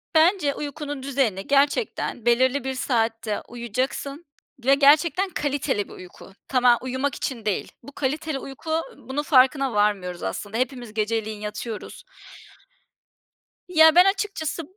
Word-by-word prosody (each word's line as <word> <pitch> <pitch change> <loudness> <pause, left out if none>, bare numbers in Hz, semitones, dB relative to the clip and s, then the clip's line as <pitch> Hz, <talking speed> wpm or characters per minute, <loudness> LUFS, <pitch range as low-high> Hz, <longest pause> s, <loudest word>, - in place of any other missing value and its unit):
Bence 315 -3 +4
uykunun 290 -1 -5
düzenini 250 -9 -1
gerçekten 280 - 0
belirli 260 +3 +3
bir 265 0 -2
saatte 225 -4 -1
uyuyacaksın 255 +6 -4 0.4
ve 275 +1 +6
gerçekten 310 +7 +4
kaliteli 280 - -1
bir - - -12
uyku. 185 +1 -13
Tama 250 -2 +4
uyumak 260 +2 -2
için 235 -5 -4
değil. 205 - -2
Bu 285 - -11
kaliteli 295 +1 -2
uyku, 275 +5 -8
ııı, 330 - -4
bunun 290 +3 -1
farkına 265 -3 +4
varmıyoruz 200 -4 0
aslında. 205 - -4
Hepimiz 250 -4 -3
geceleyin 215 -1 -2
yatıyoruz. 215 +1 -6 1.6
Ya, 320 -2 +6
ben 360 +1 +8
açıkçası 390 -5 -1
265 Hz, 125 wpm, -24 LUFS, 225-295 Hz, 1.6 s, ben